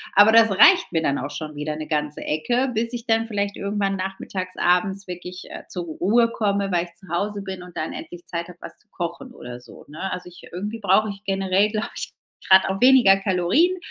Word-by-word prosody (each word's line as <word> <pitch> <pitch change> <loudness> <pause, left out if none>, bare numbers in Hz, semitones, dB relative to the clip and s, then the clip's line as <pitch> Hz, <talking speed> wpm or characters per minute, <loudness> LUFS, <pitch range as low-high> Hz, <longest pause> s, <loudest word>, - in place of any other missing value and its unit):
Aber 205 +2 +7
das 225 -1 +6
reicht 275 - +5
mir 165 -1 0
dann 140 -2 0
auch 140 +3 -4
schon 155 -1 -7
wieder 150 +1 -4
'ne 155 0 -6
ganze 150 -1 -2
Ecke, 245 - 0
bis 230 +2 -2
ich 240 0 -5
dann 225 0 +1
vielleicht 205 -2 -2
irgendwann 200 0 -1
nachmittags 185 -1 -5
abends 190 +2 +1
wirklich, 180 0 -8
äh, - - -9
zur 175 -1 -4
Ruhe 220 +9 +1
komme, 200 -3 -1
weil 175 -1 +1
ich 170 - -17
zu 190 +2 -15
Hause 200 +3 -2
bin 190 -1 -6
und 180 -1 -12
dann 155 - -3
endlich 345 +2 -9
Zeit 170 0 -4
habe, 180 - -13
was - - -9
zu - - -33
kochen 175 +10 -6
oder 125 - -9
so, 125 - -15
ne? 160 +6 -6
Also 180 -1 -6
ich 180 - -15
irgendwie 210 +6 -5
brauche 205 +2 +3
ich 200 0 -8
generell, 195 +1 +1
glaube 215 0 -3
ich, - - -3 0.4
gerade 190 0 +6
auch 195 0 -2
weniger 250 -7 +7
Kalorien. 195 - +2
195 Hz, 220 wpm, -23 LUFS, 175-215 Hz, 0.4 s, Aber